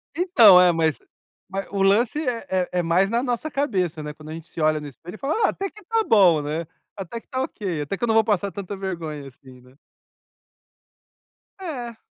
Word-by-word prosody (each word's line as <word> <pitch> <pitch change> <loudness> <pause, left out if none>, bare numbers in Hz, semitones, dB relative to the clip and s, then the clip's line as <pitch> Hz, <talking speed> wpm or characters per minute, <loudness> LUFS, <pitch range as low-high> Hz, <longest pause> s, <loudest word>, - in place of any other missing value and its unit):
Então, 240 - +7
é, 180 -1 +6
mas 160 -3 0 0.5
mas 195 +1 -4
o 200 -1 -2
lance 215 +8 +3
é 235 -2 -2
é 185 -1 0
é - - +3
mais 175 +4 +2
na 235 +2 +1
nossa 250 +4 -2
cabeça, 185 - -1
né, 150 0 -6
quando 155 0 -13
a - - -6
gente 165 0 -9
se 165 - -7
olha 155 0 +2
no 150 - -8
espelho 165 - -11
e - - -11
fala: 315 - 0
"Ah, - - +3
até 390 0 -4
que 425 +2 -16
tá 455 -1 +1
bom, 185 - +5
né, 155 +3 -3 0.3
até 195 +4 -6
que - - -28
tá 260 - -3
ok, 190 - -3
até 145 +7 -4
que - - -8
eu - - +2
não 225 - +2
vou 225 - +5
passar 200 -3 0
tanta 200 0 -6
vergonha 165 -7 -5
assim", 130 -1 -16
né. 125 +1 -20 1.9
É. 245 -11 -6
195 Hz, 215 wpm, -23 LUFS, 160-235 Hz, 1.9 s, Então